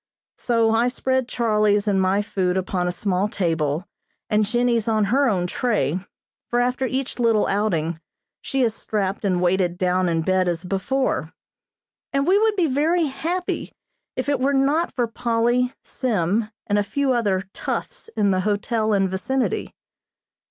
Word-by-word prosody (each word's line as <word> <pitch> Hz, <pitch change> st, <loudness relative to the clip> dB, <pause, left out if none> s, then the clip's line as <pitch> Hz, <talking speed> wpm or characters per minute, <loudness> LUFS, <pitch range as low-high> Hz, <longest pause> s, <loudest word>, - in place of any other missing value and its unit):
So 230 Hz, -2 st, +2 dB
I 230 Hz, +2 st, +3 dB
spread 260 Hz, 0 st, 0 dB
Charlie's 215 Hz, -3 st, +1 dB
and 195 Hz, -2 st, +2 dB
my 190 Hz, +2 st, +2 dB
food 185 Hz, -3 st, -1 dB
upon 185 Hz, -1 st, -1 dB
a -, -, 0 dB
small 190 Hz, +2 st, -1 dB
table, 165 Hz, -4 st, -1 dB, 0.5 s
and 210 Hz, -1 st, +3 dB
Jennie's 240 Hz, -1 st, +1 dB
on 220 Hz, -1 st, +2 dB
her 275 Hz, 0 st, +4 dB
own 180 Hz, -4 st, 0 dB
tray, 180 Hz, -, 0 dB, 0.5 s
for 240 Hz, -, +1 dB
after 250 Hz, +2 st, +1 dB
each 260 Hz, 0 st, -3 dB
little 230 Hz, -3 st, +3 dB
outing 170 Hz, -6 st, 0 dB, 0.4 s
she 270 Hz, -1 st, 0 dB
is 225 Hz, -3 st, +1 dB
strapped 200 Hz, -3 st, -2 dB
and 185 Hz, -3 st, +1 dB
weighted 180 Hz, -1 st, +1 dB
down 185 Hz, 0 st, +1 dB
in 165 Hz, -1 st, 0 dB
bed 185 Hz, +1 st, +2 dB
as 170 Hz, 0 st, -1 dB
before, 195 Hz, +9 st, -1 dB, 0.8 s
and 275 Hz, 0 st, +1 dB
we 385 Hz, +4 st, +4 dB
would 435 Hz, -1 st, +2 dB
be 365 Hz, -4 st, +2 dB
very 315 Hz, +4 st, +2 dB
happy 335 Hz, +6 st, -3 dB, 0.4 s
if 255 Hz, -, -3 dB
it 285 Hz, -2 st, +1 dB
were 275 Hz, +2 st, +2 dB
not 285 Hz, +5 st, +2 dB
for 245 Hz, -, 0 dB
Polly, 235 Hz, +2 st, +1 dB
Sim, 215 Hz, -2 st, -1 dB, 0.2 s
and 205 Hz, 0 st, +1 dB
a -, -, +2 dB
few 275 Hz, +5 st, 0 dB
other 195 Hz, -6 st, 0 dB
"toughs" -, -, -4 dB
in 200 Hz, -2 st, +3 dB
the 185 Hz, -, +1 dB
hotel 215 Hz, +2 st, 0 dB
and 195 Hz, -1 st, +3 dB
vicinity. 245 Hz, +8 st, -2 dB
215 Hz, 160 wpm, -23 LUFS, 190-255 Hz, 0.8 s, her